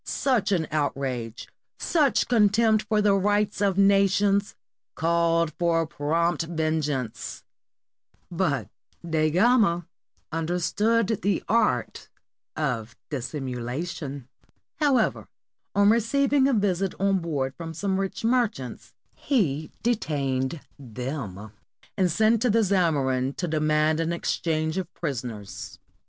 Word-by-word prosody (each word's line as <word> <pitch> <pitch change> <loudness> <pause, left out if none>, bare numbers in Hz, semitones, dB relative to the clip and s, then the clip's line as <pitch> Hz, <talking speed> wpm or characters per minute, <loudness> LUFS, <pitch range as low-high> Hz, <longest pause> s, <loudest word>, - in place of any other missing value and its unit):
Such 240 -7 0
an 170 -5 +1
outrage, 135 -6 -2 0.3
such 300 -6 +2
contempt 215 -1 +3
for 210 -2 +2
the 205 -1 +4
rights 205 +1 +1
of 200 -2 +2
na 200 0 +5
tions, 200 +1 +1 0.4
called 165 -1 +1
for 165 -1 +2
prompt 165 +3 0
vengeance, 155 -7 -2 0.9
but 155 - 0 0.4
Da 155 -1 +2
Gama 185 -2 +3 0.5
un 160 0 -2
derstood 210 +5 +1
the 200 +1 0
art 215 - 0 0.5
of 120 -7 -2 0.2
dissimulation; 135 +1 -4 0.5
however, 275 -7 +1 0.5
on 200 +1 +5
receiving 270 +4 +2
a 275 - +2
visit 195 -3 0
on 195 0 +2
board 140 -6 -2
from 165 -1 -6
some 190 +4 -1
rich 195 +2 -3
merchants, 225 - -1 0.2
he 160 - 0
detained 145 - -1 0.2
them, 120 -5 -6 0.4
and 185 -2 +2
sent 220 +5 +3
to 250 - +2
the 225 +1 +3
Zamorin 140 -9 +1
to 180 - -3
demand 155 0 +1
an 165 0 0
exchange 160 0 -1
of 180 -2 -6
prisoners. 120 - -5
170 Hz, 115 wpm, -25 LUFS, 145-205 Hz, 0.9 s, na